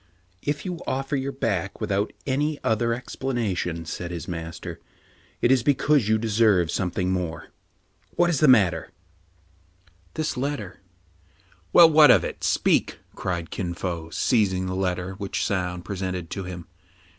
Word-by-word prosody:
" 90 +1 -38
If 150 - -6
you 180 -3 -4
offer 135 +2 -1
your 135 0 -2
back 100 -8 -2
without 105 -1 -1
any 145 +3 0
other 115 +1 +1
ex 120 +2 -5
planation, 95 -10 -2
said 85 +2 -5
his 85 -1 -6
master, 85 -2 -6 0.6
"it 120 - +4
is 130 -2 +4
because 140 -2 +2
you 110 - +4
de 115 +1 -3
serve 105 -6 +3
something 90 0 -1
more. 90 -3 -3 0.7
What 175 - +3
is 155 - 0
the 155 - +5
matter 105 -9 +4 0.3
} 85 +1 -36 0.2
" 90 +1 -36
" 90 -1 -33
This 155 -3 -1
letter." 125 -9 -4 0.5
" 90 0 -34
Well, 170 - +9
what 150 -2 +8
of - - +6
it? - - -6
Speak! - - +2 0.2
cried 85 -3 -4
Kin 85 -3 -3
Fo, 85 -3 -4
seiz 105 - +2
ing 95 0 -2
the 95 - -3
letter 95 0 -2
which 100 -2 -2
Soun 90 -2 -2
presented 90 -3 -4
to 95 -2 -4
him. 90 -2 -7
95 Hz, 170 wpm, -25 LUFS, 90-125 Hz, 0.7 s, Well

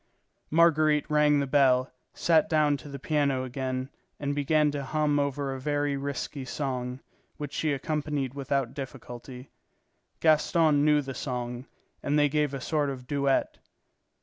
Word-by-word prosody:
Marguerite 155 -2 +4
rang 150 -1 +4
the 140 - 0
bell, 130 -2 +3 0.2
sat 160 -2 +3
down 150 -2 +3
to 145 - -11
the 140 - -6
piano 140 -2 0
again, 130 +1 -4 0.3
and 145 -1 -2
began 150 +1 +2
to 145 -1 -4
hum 150 +1 +1
over 140 -1 -1
a 135 - -6
very 145 +1 0
risky 140 0 -4
song, 130 -1 -4 0.4
which 145 -1 -6
she 155 -1 0
accompanied 145 -2 -2
without 135 -2 -2
difficulty. 130 -1 -9 0.7
Gaston 155 -1 +3
knew 150 -1 +4
the 135 0 -6
song, 125 0 -4 0.3
and 145 +1 0
they 145 -1 +4
gave 150 -1 +1
a - - -4
sort 150 +1 0
of 130 -2 -6
duet. 140 0 0
140 Hz, 150 wpm, -28 LUFS, 130-150 Hz, 0.7 s, Marguerite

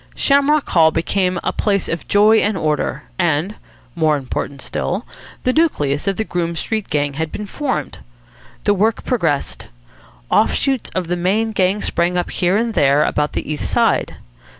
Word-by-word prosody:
Shamrock 285 +1 +3
Hall 160 -2 +5
became 180 +3 0
a - - -1
place 200 -3 0
of 165 - -4
joy 210 +2 +5
and 205 -2 +1
order; 150 -2 -1 0.2
and 175 +2 +1 0.4
more 155 -3 +2
important 135 +1 -5
still 195 +7 -3 0.4
the 255 - +1
nucleus 150 - +1
of 195 - +1
the 220 - 0
Groome 170 -4 -2
Street 215 +4 -3
Gang 145 -2 0
had 160 +2 -3
been 210 - -5
formed. 265 +6 -3 0.6
The 205 - +3
work 215 +3 +1
progressed. 165 - -1 0.6
Off - - +3
shoots 270 -3 -1
of 185 -1 -1
the 175 - 0
main 205 +6 0
gang 195 0 +1
sprang 175 +1 0
up 175 - -2
here 180 +2 +1
and 230 +1 -1
there 140 -4 +3
about 150 0 0
the - - -4
East 150 -1 -3
Side. - - +1
180 Hz, 170 wpm, -19 LUFS, 155-215 Hz, 0.6 s, Hall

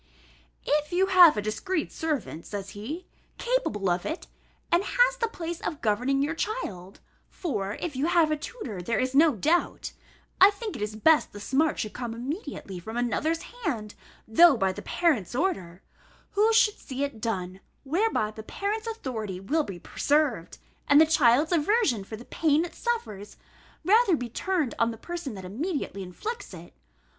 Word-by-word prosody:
"If 300 +1 +1
you 365 +2 +3
have 360 - +7
a 210 - -1
discreet 310 - -2
servant," 295 - -3
says 200 -1 -6
he, 285 - -6 0.3
"capable 470 - -1
of 175 0 +1
it, 320 +3 -4 0.5
and 345 +3 +4
has - - +3
the 465 - 0
place 340 -5 -6
of 305 - -4
governing 250 +6 +1
your 305 +3 -1
child 200 - -4 0.3
(for 210 - -3
if 335 -5 -5
you 275 +5 0
have 340 -3 +3
a - - +2
tutor, 295 - -7
there 230 +6 -1
is 255 +1 0
no 300 0 +5
doubt), 320 - 0 0.5
I 385 - +10
think 415 +1 -6
it - - -7
is 210 0 -3
best 305 +8 +3
the 205 - -8
smart 285 +9 +1
should 215 - -3
come 240 -2 -5
immediately 255 - -6
from 220 +7 -7
another's 305 +7 0
hand, 285 - -4 0.3
though 295 +5 +6
by 195 -3 +1
the - - -7
parent's 275 - 0
order, 190 - -2 0.5
who 425 +2 +3
should 440 -2 +4
see 265 +1 -4
it 280 -6 -4
done, 185 -5 -3 0.2
whereby 305 - 0
the 220 - -9
parent's 415 - -3
authority 225 - -4
will 290 +12 0
be 195 -9 -7
preserved, 280 - 0 0.3
and 285 - +7
the 320 - +8
child's 295 -1 +4
aversion 335 - +2
for 220 - -8
the 235 +3 -11
pain 315 0 +2
it 350 - -9
suffers, 215 - -4 0.5
rather 420 -1 +5
be 245 -2 -5
turned 330 - -1
on 230 - +3
the 225 - -6
person 340 -2 -6
that 190 -1 -8
immediately 265 - -3
inflicts 200 - -6
it. 170 0 -12
285 Hz, 170 wpm, -27 LUFS, 215-350 Hz, 0.5 s, I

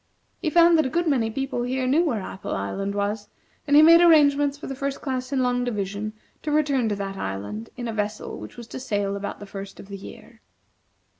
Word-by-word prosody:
He 325 - 0
found 340 0 +6
that 315 - +3
a - - -3
good 340 +5 0
many 250 -7 +2
people 270 +1 -2
here 255 +1 -1
knew 285 +7 +3
where 240 - 0
Apple 190 - -5
Island 195 - -3
was, 205 +1 -2 0.4
and 290 - +4
he 300 - +9
made 335 +2 +8
arrangements 290 -4 +5
for 290 - -9
the 270 - -4
First 275 +1 -3
Class 260 -1 -3
in 265 -2 +1
Long 245 0 +1
Division 210 -2 -3 0.3
to 305 - -4
return 280 -6 +2
to 205 - 0
that 195 -1 -5
island 100 - -5
in 240 -1 -4
a 225 - -3
vessel 210 0 -3
which - - -10
was 240 - -8
to - - -6
sail 205 -5 -1
about 200 0 -5
the 205 - -8
first 195 0 -8
of 195 - -11
the 200 - -6
year. 225 +3 -12
245 Hz, 225 wpm, -24 LUFS, 200-280 Hz, 0.4 s, he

